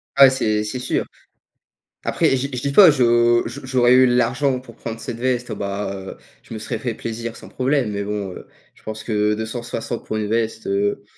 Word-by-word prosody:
Ah 140 - +9
ouais, - - +7
c'est 110 -5 0
c'est 105 +4 -4
sûr. 125 - -1 1.0
Après, - - +1
j 140 +2 -3
je 125 - -3
dis 140 - -1
pas, 180 +2 +8
je 120 -3 +4
je 130 +4 -8
j'aurais 125 -2 +4
eu 130 0 +7
l'argent 125 +2 +1
pour 120 -3 -14
prendre 115 0 -6
cette 115 +1 -6
veste, 125 0 -1
heu, - - -3
bah, 100 0 -3
heu, 95 0 -8 0.3
je - - -11
me 110 - -5
serais - - -4
fait 120 -2 -3
plaisir 115 +1 -5
sans - - -11
problème, 130 -3 0
mais 100 0 -3
bon, 100 -2 -3
heu, - - -11 0.3
je - - -24
pense 110 0 -6
que 105 -1 +1
260 115 +1 -4
pour - - -4
une 105 -1 -2
veste, 110 0 -1
heu, 100 +1 0
115 Hz, 215 wpm, -21 LUFS, 110-125 Hz, 1.0 s, Ah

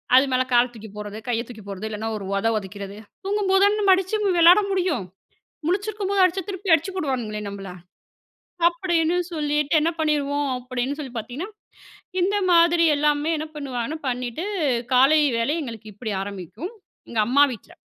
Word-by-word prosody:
அது 260 - +7
மேல 255 0 +2
கால 240 +1 +6
தூக்கி 220 -1 -10
போட்றது 210 0 -6
கைய 235 -2 0
தூக்கி 225 -4 -11
போட்றது. 200 +2 -5
இல்லனா 215 +1 -4
ஒரு 200 - -7
ஒத 200 +3 +1
ஒதைக்கிறது. 200 0 -7 0.3
தூங்கும்போது 390 -1 +2
தான் 415 +1 +3
நம்ம 395 -2 +5
அடிச்சு 380 +3 -1
நம்ம 405 -2 +1
வெளையாட 350 +5 +8
முடியும். 355 - 0 0.6
முழிச்சிருக்கும்போது 395 +1 +1
அடிச்சா 365 0 +2
திருப்பி 380 -2 +1
அடிச்சி 325 +5 +2
போடுவானுங்களே 245 - -2
நம்மள. 195 -1 -7 1.0
அப்டின்னு 340 -1 +1
சொல்லிட்டு 300 -1 +1
என்ன 320 +2 +1
பண்ணிருவோம், 290 -2 0
அப்டின்னு 250 +2 -3
சொல்லி 265 -4 -6
பார்த்தீங்கன்னா, 250 - -5 0.7
இந்த 395 +3 +1 0.2
மாதிரி 340 0 +5
எல்லாமே 295 +2 +1
என்ன 310 - -4
பண்ணுவாங்கன்னா 280 +1 -4
பண்ணிட்டு 250 +6 -3 0.5
காலை 275 +5 +6 0.2
வேளை 250 +7 +1
எங்களுக்கு 225 -4 -8
இப்டி 215 0 -5
ஆரம்பிக்கும். 200 - -7 0.4
எங்க 225 -2 +1
அம்மா 280 +4 +6
வீட்ல. 225 - -13
290 Hz, 155 wpm, -23 LUFS, 230-350 Hz, 1.0 s, வெளையாட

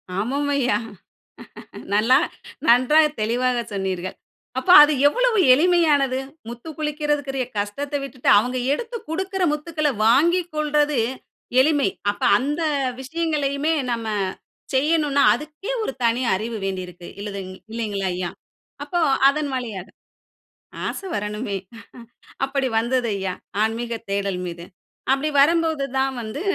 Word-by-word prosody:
ஆமாம் 275 +9 -1
ஐயா. 250 -6 +2 1.2
நல்லா 220 +5 +4 0.5
நன்றாக 255 +6 +6 0.2
தெளிவாக 245 +3 +1
சொன்னீர்கள். 185 -2 -3 0.4
அப்ப 260 - -5
அது 295 - +5 0.2
எவ்வளவு - - +1 0.2
எளிமையானது, 295 -5 +3 0.3
முத்துக்குளிக்குரியதுக்குரிய 295 0 -3
கஷ்டத்த 275 +9 -3
விட்டுட்டு, 265 -2 -4
அவுங்க 250 +4 -1
எடுத்து 470 +8 -3
குடுக்குற 380 +3 -2
முத்துக்கள 300 0 -1 0.2
வாங்கிக்கொள்றது 300 0 +2 0.6
எளிமை. 290 -4 +3 0.2
அப்ப 205 - -8 0.2
அந்த 295 +5 -2 0.4
விஷயங்களையுமே 300 0 -1 0.2
நம்ம 230 -1 -3 0.7
செய்யணுன்னா, 290 0 +2
அதுக்கே 305 - -6
ஒரு 430 - -2
தனி 235 +2 +2
அறிவு 220 +4 -3
வேண்டி 190 -1 -2
இருக்கு 175 0 -12
இல்லதுங் 195 -2 -6 0.2
இல்லைங்களா 205 -4 -2
ஐயா. 180 -1 -3 0.5
அப்போ 345 +4 -1 0.3
அதன் 290 +1 0
வழியாக, 220 -8 -5 1.0
ஆசை 390 - -5
வரணுமே, 210 0 -3 0.9
அப்படி 270 -1 -1
வந்தது 240 +1 0
ஐயா 190 -1 -3 0.3
ஆன்மீக 230 +2 -2 0.2
தேடல் 195 -2 -1
மீது. 170 0 -7 0.5
அப்டி 275 +3 0
வரும்போது 320 0 +3 0.2
தான் 270 0 +1
வந்து 220 +7 -6
270 Hz, 110 wpm, -22 LUFS, 220-300 Hz, 1.2 s, நன்றாக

